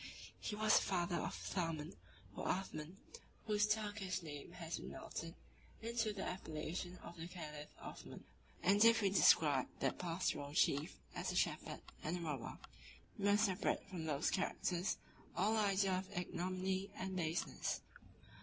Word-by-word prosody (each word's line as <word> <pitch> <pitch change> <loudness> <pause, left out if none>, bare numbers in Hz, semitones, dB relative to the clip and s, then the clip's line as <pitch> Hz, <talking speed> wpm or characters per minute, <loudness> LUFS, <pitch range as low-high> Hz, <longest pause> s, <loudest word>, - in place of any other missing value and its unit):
He 210 - -3
was 215 0 +5
the - - +5
father 175 -2 +1
of - - -2
Thaman, 165 -4 -2 0.4
or - - -3
Athman, 180 -3 -2 0.5
whose 210 -1 +3
Turkish 205 -4 0
name 145 -3 -7
has 165 -2 -4
been - - -6
melted 165 +1 -6 0.4
into 230 -1 0
the 200 -2 -4
appellation 175 +1 -3
of 170 - -9
the 165 +1 -5
caliph 150 -4 -7
Othman; - - -8 0.4
and 200 +3 +6
if 230 -1 +7
we 195 - +4
describe 145 -8 +6
that - - 0
pastoral 165 -5 -1
chief 145 0 +3 0.2
as - - -1
a - - -4
shepherd - - 0 0.2
and 165 +4 0
a - - -5
robber, 150 -7 -3 0.6
we 200 - 0
must 205 +2 +6
separate 190 -1 0
from 175 -4 -4
those 150 -1 +1
characters 185 0 0 0.4
all 210 +5 +3
idea 195 -3 +3
of 190 -1 -8
ignominy 185 +2 -1
and 190 0 -3
baseness. 165 -1 -1
185 Hz, 150 wpm, -39 LUFS, 165-200 Hz, 0.6 s, if